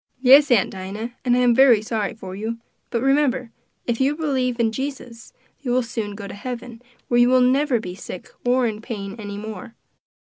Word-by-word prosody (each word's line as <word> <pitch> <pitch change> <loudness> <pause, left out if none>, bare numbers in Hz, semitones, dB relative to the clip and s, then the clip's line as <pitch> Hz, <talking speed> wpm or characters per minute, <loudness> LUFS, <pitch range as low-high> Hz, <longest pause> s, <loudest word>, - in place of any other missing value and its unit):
"Yes, 275 +3 +7
Aunt 240 -6 +3
Dinah, 200 +5 -6
and 245 -1 +3
I - - +3
am 245 -1 +4
very 240 -4 +6
sorry 215 -1 -2
for 190 -4 -8
you; 220 +3 -4 0.3
but 235 0 -1
remember, 270 -3 +1 0.3
if 235 +1 -1
you 280 +3 +2
believe 260 -6 -1
in 225 -1 +2
Jesus, 250 -3 -6 0.3
you 265 - -5
will 250 +1 +2
soon 225 -4 -4
go 200 -1 -7
to - - -8
heaven, 240 +1 -7 0.3
where 240 - +2
you 240 0 +5
will 255 0 +5
never 260 0 +3
be 180 -4 -6
sick 185 -1 -9
or 250 +1 +2
in 215 -2 -3
pain 200 -4 -6
any 205 -1 -6
more. 220 +2 -8
240 Hz, 200 wpm, -22 LUFS, 215-255 Hz, 0.3 s, Yes